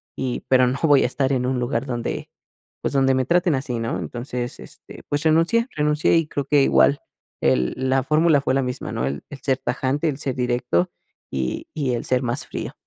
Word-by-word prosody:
y 125 -2 -3
pero 130 -1 +5
no 130 +2 -1
voy 145 -4 +5
a - - +3
estar 135 +2 0
en 125 -1 0
un 130 -1 0
lugar 125 +2 -1
donde, 120 -2 -4 0.5
pues, - - -2
donde 135 -1 +3
me 130 0 +1
traten 175 +1 +2
así, 130 -3 -3
¿no? 115 0 -2
Entonces, 120 0 -5
este, - - -13
pues 145 +1 -1
renuncié 165 +9 +3
renuncié 150 +1 +2
y 165 -2 +1
creo 140 -2 -3
que 145 +1 +4
igual 140 +1 +4 0.4
el 65 -1 +2
la 130 0 +1
fórmula 155 +2 +3
fue 130 - 0
la 135 - +2
misma, 125 0 -4
¿no? - - -2
El 70 +1 -4
el 145 - -9
ser 130 -2 +1
tajante, 135 +5 -1
el 140 - -3
ser 135 -3 -2
directo 120 -8 0 0.4
y 65 -2 -2
y 140 -5 -1
el 120 - -2
ser 125 -1 +1
más 120 -1 -2
frío. - - -5
130 Hz, 210 wpm, -22 LUFS, 125-145 Hz, 0.5 s, pero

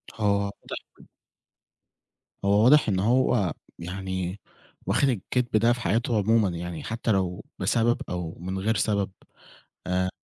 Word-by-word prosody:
هو 105 -2 +2
واضح 100 0 -7 1.4
هو 100 +2 +4
واضح 140 -1 +6
إن 95 -2 +1
هو 110 -4 +2 0.3
يعني 95 +1 -4 0.5
واخد 140 - +2
الكدب 120 +1 0
ده 120 +2 +4
في 120 - -6
حياته 115 +1 +1
عمومًا 110 -1 +3
يعني 85 -1 -5
حتّى 115 0 -2
لو 95 -2 -1
بسبب 120 +1 +2
أو 90 -2 -4
من 95 +2 -4
غير 110 +4 +1
سبب 100 -1 +1 0.8
آآ، 90 0 +1
100 Hz, 130 wpm, -26 LUFS, 95-115 Hz, 1.4 s, واضح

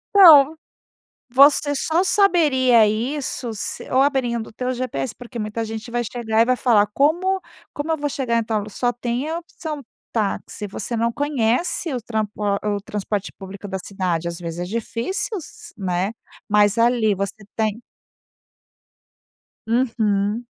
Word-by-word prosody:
Então, 315 -6 +9 0.7
você 285 +3 +5
só 320 +5 +1
saberia 295 - +4
isso 240 +3 -2
se 210 - -6
ou 260 - +3
abrindo 245 -5 +1
o - - -12
teu 250 +3 -2
GPS, 240 - -3
porque 240 -1 -8
muita 215 +1 -3
gente 220 +1 -6
vai 240 0 -1
chegar 225 -1 0
e - - +5
vai 255 +1 +2
falar 215 -5 +4
"Como 350 - +2 0.3
como 290 +2 -4
eu - - -1
vou 290 0 -2
chegar 250 -4 -1
em 230 - +1
tal 220 -1 -1
lu", 205 +1 -6
só 245 +4 0
tem 245 +4 -3
a 330 +1 -2
opção 320 -3 -7 0.3
táxi, 210 -1 -2
você 215 +4 -4
não 230 +1 +2
conhece 285 +4 0
o 250 - -2
trampo 220 -2 -2
o 210 - -5
a 200 -1 +1 0.2
o 200 - -4
transporte 205 0 -3
público 195 +1 -9
da 190 -1 -3
cidade. 180 -4 -2
Às 170 0 -5
vezes, 170 -1 -5
é - - -1
difícil 230 - -3
s 320 - -11
né, 190 0 -1 0.4
mas 205 0 +4
ali 230 -3 +3
você 200 +2 -5
tem 220 0 -1 1.9
Uhum. 225 -2 0
235 Hz, 160 wpm, -22 LUFS, 210-275 Hz, 1.9 s, Então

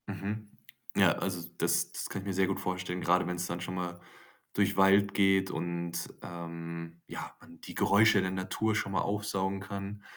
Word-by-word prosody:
Mhm. 105 +1 -4 0.5
Ja, - - +6
also, 90 -3 -3
das - - +2
das - - -4
kann 95 - -4
ich - - -10
mir 95 - -1
sehr 95 0 +3
gut 95 - -1
vorstellen, 90 -1 -3
grade 90 +1 +3
wenn's 90 0 -2
dann 85 0 -4
schon 90 +1 -4
mal 90 -1 -3 0.5
durch 100 -1 +2
Wald 100 +1 +5
geht 95 -1 +4
und, 85 0 -3
ähm, 85 -1 -7
ja, - - -6
man - - -16
die - - -9
Geräusche 105 0 +5
der 95 0 -1
Natur 100 +4 0
schon 100 -2 -1
mal 95 - +1
aufsaugen 100 -2 -1
kann. 100 +1 -6
95 Hz, 185 wpm, -31 LUFS, 85-100 Hz, 0.5 s, Ja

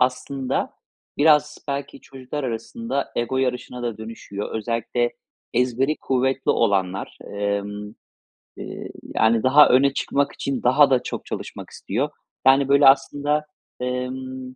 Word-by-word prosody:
aslında, 130 +1 -1 0.4
biraz 150 -1 +4
belki 140 0 -4
çocuklar 135 +2 -6
arasında 140 - -3
ego 120 +2 -1
yarışına 125 -1 -2
da 115 -3 -3
dönüşüyor. 110 -2 -7
Özellikle 115 +2 -1 0.4
ezberi 125 +4 +1
kuvvetli 130 +1 +1
olanlar, 95 -1 0 0.2
emm, 105 +1 -3 0.6
eee, - - -7 0.2
yani, 110 +1 +3
daha 145 +3 +7
öne 135 +2 +4
çıkmak 140 0 0
için 135 -2 -3
daha 135 +4 +5
da 130 -2 +2
çok - - -5
çalışmak - - -7
istiyor. 130 +9 -2 0.4
Yani, 135 +1 +5
böyle 140 0 +6
aslında, 145 +2 +3 0.3
emm, 130 +1 -4
130 Hz, 120 wpm, -23 LUFS, 115-140 Hz, 0.6 s, daha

